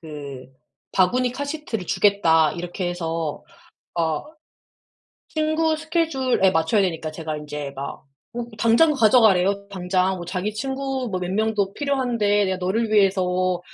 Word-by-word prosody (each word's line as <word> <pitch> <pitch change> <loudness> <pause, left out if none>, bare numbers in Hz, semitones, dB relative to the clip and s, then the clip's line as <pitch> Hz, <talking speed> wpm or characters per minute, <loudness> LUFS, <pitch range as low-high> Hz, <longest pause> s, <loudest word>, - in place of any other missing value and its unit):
그 140 -5 -8 0.5
바구니 245 +7 +2
카시트를 285 - -4
주겠다. 165 -8 +3
이렇게 175 +2 -4
해서 165 -3 -3 0.5
어 160 -3 -1 1.0
친구 315 0 +1
스케줄에 310 - +1
맞춰야 160 +6 +2
되니까 165 -4 -2
제가 155 -1 -5
인제 150 -2 -6
막 140 +1 -6 0.3
음 240 -1 -4
당장 235 +8 +4
가져 245 -2 +5
가래요 200 -1 +3
당장. 185 0 0
뭐 175 - -6
자기 185 +4 -3
친구 265 +1 -3
뭐 185 - -1
몇 180 0 -3
명도 210 -1 0
필요한데 240 -8 +1
"내가 190 0 -1
너를 215 +5 -1
위해서 185 -3 +2
195 Hz, 280 characters per minute, -23 LUFS, 175-245 Hz, 1.0 s, 가져